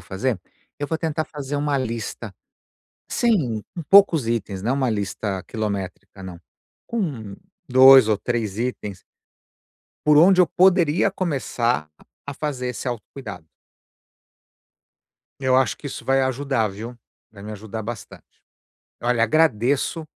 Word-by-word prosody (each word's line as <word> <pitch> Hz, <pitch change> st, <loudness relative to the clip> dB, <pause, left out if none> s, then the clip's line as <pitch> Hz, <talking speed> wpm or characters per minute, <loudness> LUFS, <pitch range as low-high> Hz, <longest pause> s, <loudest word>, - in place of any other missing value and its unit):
fazer? 100 Hz, +2 st, -3 dB, 0.4 s
Eu 145 Hz, -, -3 dB
vou 160 Hz, -, -1 dB
tentar 160 Hz, -1 st, -2 dB
fazer 145 Hz, -1 st, -6 dB
uma 145 Hz, 0 st, 0 dB
lista, 115 Hz, -4 st, -4 dB, 0.7 s
sem 145 Hz, -, +1 dB
com 170 Hz, -, -5 dB
poucos 195 Hz, -, +6 dB
itens, 105 Hz, -4 st, -2 dB
não 120 Hz, -, 0 dB
é -, -, +1 dB
uma 130 Hz, -3 st, 0 dB
lista 100 Hz, -2 st, -3 dB
quilométrica 100 Hz, -3 st, -5 dB
não. 90 Hz, -2 st, -8 dB, 0.5 s
Com 140 Hz, -, -4 dB, 0.3 s
2 130 Hz, -3 st, +8 dB
ou 105 Hz, -2 st, +2 dB
3 110 Hz, -4 st, -3 dB
itens. 105 Hz, -6 st, -4 dB, 1.0 s
Por 150 Hz, 0 st, +6 dB
onde 180 Hz, +4 st, +6 dB
eu 180 Hz, -, +6 dB
poderia 175 Hz, 0 st, +3 dB
começar 125 Hz, -, -1 dB, 0.2 s
a -, -, -49 dB, 0.2 s
a -, -, -7 dB
fazer 135 Hz, -4 st, -4 dB
esse 125 Hz, +1 st, -6 dB
autocuidado. 115 Hz, -, -7 dB, 1.9 s
Eu 130 Hz, -1 st, +2 dB
acho 130 Hz, -6 st, +2 dB
que 145 Hz, -, -9 dB
isso -, -, -7 dB
vai 135 Hz, 0 st, +2 dB
ajudar, 130 Hz, -3 st, 0 dB
viu. 115 Hz, +5 st, -8 dB, 0.3 s
Vai 100 Hz, -2 st, -13 dB
me 105 Hz, +1 st, -7 dB
ajudar 110 Hz, +1 st, -7 dB
bastante. 115 Hz, 0 st, -8 dB, 0.8 s
Olha, 120 Hz, -1 st, +2 dB
agradeço 140 Hz, +3 st, +1 dB
125 Hz, 135 wpm, -22 LUFS, 110-145 Hz, 1.9 s, 2